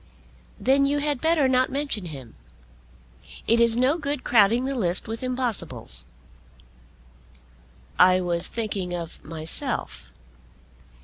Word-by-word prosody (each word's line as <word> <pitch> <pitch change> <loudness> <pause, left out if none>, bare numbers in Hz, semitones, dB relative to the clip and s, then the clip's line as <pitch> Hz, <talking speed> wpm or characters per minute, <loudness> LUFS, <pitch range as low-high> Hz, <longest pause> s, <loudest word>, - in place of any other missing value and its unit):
"Then 275 +1 +3
you 285 +1 0
had 290 -2 -1
better 320 -4 +3
not 255 0 +2
mention 275 -8 -2
him. 135 -8 -9 1.1
It 230 +1 +3
is 235 0 +4
no 265 +7 +2
good 285 -2 -3
crowding 230 +2 +3
the 275 - -2
list 185 -8 0
with 225 +1 -5
impossibles." 170 - -3 1.9
"I 185 0 +6
was 175 -2 +2
thinking 195 -6 -3
of 170 -2 -7
myself." 160 +1 -3
230 Hz, 115 wpm, -24 LUFS, 175-265 Hz, 1.9 s, I